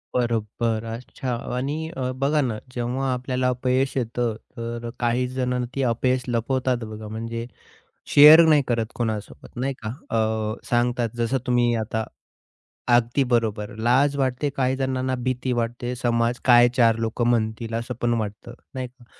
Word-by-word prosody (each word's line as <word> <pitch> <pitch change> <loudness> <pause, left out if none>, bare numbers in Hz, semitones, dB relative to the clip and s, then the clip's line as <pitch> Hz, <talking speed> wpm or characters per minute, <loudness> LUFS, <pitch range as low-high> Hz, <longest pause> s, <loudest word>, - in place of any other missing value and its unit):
बरोबर. 115 -1 0
अच्छा 125 +1 -5 0.2
आणि 150 +5 -2
अ, 130 -1 -1
बघा 150 +2 +2
ना, 120 -5 -1 0.2
जेव्हा 130 +2 -1
आपल्याला 125 0 -1
अपयश 130 +1 0
येतं. 120 -2 -1 0.2
तर 115 0 -5
काहीजण 125 +1 0
ती 135 - 0
अपयश 125 +2 +1
लपवतात 125 +1 0
बघा, 110 0 -7
म्हणजे 115 +2 -5 0.7
शेअर 150 +3 +10
नाही 150 -2 +5
करत 115 -2 +1
कोणासोबत, 110 -3 -4
नाही 135 +3 -1
का? 110 - -3 0.2
अ, 110 0 -1
सांगतात 120 -1 +1
जसं 120 +3 +1
तुम्ही 120 -1 +3
आता 110 0 -2 0.9
अगदी 120 +3 +1
बरोबर. 110 -3 0
लाज 130 +5 +3
वाटते, 135 +1 0
काहीजणांना 130 0 0
भीती 130 0 -1
वाटते. 120 +1 -2
समाज 120 0 0
काय 120 -1 +7
चार 115 -2 +4
लोक 115 +1 -2
म्हणतील? 115 -1 0
असं 115 +2 -3
पण 120 0 +2
वाटतं, 105 +3 -6 0.2
नाही 130 -1 -4
का 125 0 -22
120 Hz, 140 wpm, -24 LUFS, 115-130 Hz, 0.9 s, शेअर